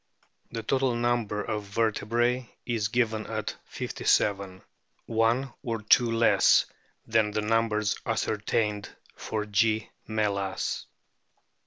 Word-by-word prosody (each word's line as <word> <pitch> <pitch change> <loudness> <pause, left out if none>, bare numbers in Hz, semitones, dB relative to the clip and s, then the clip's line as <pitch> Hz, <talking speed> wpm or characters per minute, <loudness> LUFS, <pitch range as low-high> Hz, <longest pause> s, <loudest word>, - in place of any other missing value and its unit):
The 115 -1 -4
total 130 -2 +1
number 120 -3 0
of 105 +1 -2
vertebrae 115 +4 0 0.2
is 115 -4 0
given 110 -1 0
at 110 -2 -3
57, 100 -2 0 0.4
one 115 +4 +1
or 115 -5 -3
two 115 +2 +4
less 115 0 +5 0.4
than 110 -1 +2
the 105 +1 -1
numbers 110 -1 +1
ascertained 105 -2 -1 0.3
for 105 -1 -3
G. 110 +1 +1 0.2
me 110 -1 0
las. 100 -1 -3
110 Hz, 110 wpm, -27 LUFS, 105-115 Hz, 0.4 s, less